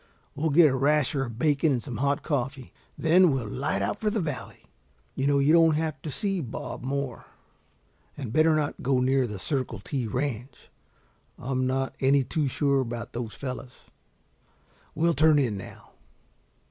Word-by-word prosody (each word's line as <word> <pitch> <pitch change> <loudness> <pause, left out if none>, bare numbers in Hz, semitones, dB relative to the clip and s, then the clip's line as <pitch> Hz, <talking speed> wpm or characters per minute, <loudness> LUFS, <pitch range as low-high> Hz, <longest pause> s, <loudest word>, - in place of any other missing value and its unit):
We'll 160 +3 -1
get 155 0 +6
a - - 0
rasher 140 0 +2
of 115 -3 -8
bacon 150 +2 +2
and 125 -3 -1
some 125 -6 -6
hot 140 +3 0
coffee, 135 -3 -3 0.2
then 175 +3 +5
we'll 130 -6 -1
light 135 +8 -2
out - - -2
for 215 - +1
the 215 +1 -1
valley. 150 -7 -5 0.5
You 135 - -1
know 140 0 +3
you 140 +3 +4
don't 165 -2 +5
have 155 -1 -2
to 155 - -5
see 195 +5 -2
Bob 120 -6 -6
Moore. 135 -1 -4 0.9
And 125 -6 -5
better 155 +1 +4
not 150 -1 -2
go 130 0 +2
near 130 0 +2
the 105 -2 -6
Circle 130 -1 -3
T 125 +3 -3
Ranch. 125 +1 -4 0.7
I'm 130 0 -1
not 135 +1 -1
any 135 +1 +3
too 145 +3 -1
sure 140 +1 +1
about 120 -1 -5
those 120 -2 -5
fellows. 130 -2 -7 1.2
We'll 170 +2 +2
turn 155 0 +4
in 125 -7 +1
now." 95 - -10
140 Hz, 170 wpm, -26 LUFS, 125-150 Hz, 1.2 s, get